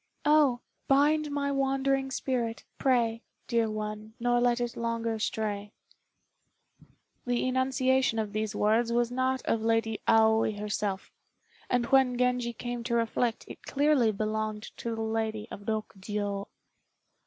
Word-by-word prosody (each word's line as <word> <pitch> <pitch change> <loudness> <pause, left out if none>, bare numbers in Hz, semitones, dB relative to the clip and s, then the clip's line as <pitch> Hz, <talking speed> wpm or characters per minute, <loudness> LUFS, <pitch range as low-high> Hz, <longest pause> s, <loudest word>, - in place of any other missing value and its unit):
Oh, 295 -5 +4 0.3
bind 295 +2 +3
my 285 0 -1
wandering 270 0 +1
spirit, 245 -4 -2 0.2
pray, 235 -4 +2 0.2
Dear 230 -2 +1
one, 215 0 -5
nor 240 0 +2
let 245 0 +2
it 240 -1 -2
longer 230 -1 -2
stray." 210 -1 -2 1.5
The 245 +1 +1
enunciation 260 -1 +2
of 215 -2 -2
these 215 0 -2
words 225 +3 +2
was 240 0 +1
not 260 0 0
that - - +1
of 225 - -2
Lady 225 -1 0
Aoi 220 0 +4
herself; 205 -2 -3 0.6
and 245 -1 +2
when 255 -1 +3
Genji 250 -1 +1
came 240 0 -5
to 235 -1 0
reflect, 230 0 0
it - - -10
clearly 285 -5 +3
belonged 215 0 -3
to 230 -1 -3
the 225 - -3
Lady 220 -1 -2
of 205 - -9
Rokjiô. 205 -2 -3
230 Hz, 135 wpm, -29 LUFS, 220-255 Hz, 1.5 s, Oh